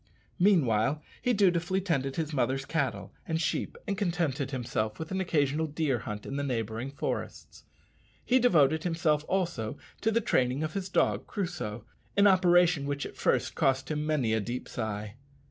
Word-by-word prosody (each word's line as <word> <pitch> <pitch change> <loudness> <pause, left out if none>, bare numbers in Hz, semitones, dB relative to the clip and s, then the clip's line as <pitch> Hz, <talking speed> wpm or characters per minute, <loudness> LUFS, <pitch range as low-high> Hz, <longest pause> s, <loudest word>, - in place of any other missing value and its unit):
Meanwhile 145 - +3 0.2
he 250 - +2
dutifully 190 -4 +2
tended 140 -8 -1
his 160 -1 -2
mother's 135 0 0
cattle 145 -3 -2
and 160 0 0
sheep, 165 - -2
and 200 - 0
contented 165 -8 -1
himself 115 -5 -2
with 160 - -6
an 190 0 0
occasional 155 -3 +1
deer 145 -4 0
hunt 105 -1 -6
in 135 - -4
the 140 - -1
neighbouring 115 -1 -2
forests. 140 - -5 0.6
He 255 +1 +4
devoted 160 - +4
himself 165 -3 +1
also 170 - -1 0.2
to 220 - +2
the 225 +1 +2
training 130 - +1
of 155 0 -3
his 195 -1 -3
dog - - +1
Crusoe 175 - -4 0.3
an 200 - +6
operation 175 -5 +4
which 145 0 -2
at - - -8
first - - +1
cost 135 +1 +1
him 150 -1 -1
many 150 -8 +1
a 110 - +2
deep 120 +4 -4
sigh. 105 -1 -4
150 Hz, 165 wpm, -29 LUFS, 130-175 Hz, 0.6 s, an